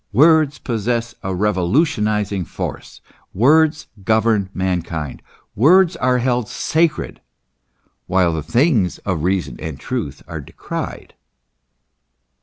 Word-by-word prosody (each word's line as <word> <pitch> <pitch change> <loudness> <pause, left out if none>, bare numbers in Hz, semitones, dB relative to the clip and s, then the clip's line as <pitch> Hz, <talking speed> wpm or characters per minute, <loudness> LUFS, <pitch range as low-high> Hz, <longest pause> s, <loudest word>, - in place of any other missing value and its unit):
Words 155 +3 +4
possess 115 0 -2
a 95 -1 -3
revolution 105 - +1
izing 105 -4 -1
force; - - -6 0.3
words 155 +8 +3 0.2
govern 110 -2 +2
mankind. 90 -6 -3 0.3
Words 175 - +5
are 125 -4 +2
held 125 -2 0
sacred; 160 -1 -1 0.9
while 90 -2 +2
the 80 - -2
things 110 - +1
of 95 -6 -1
reason 90 -9 -1
and 80 -4 -6
truth - - -4
are - - -6
decried. - - -7
110 Hz, 105 wpm, -19 LUFS, 95-140 Hz, 0.9 s, Words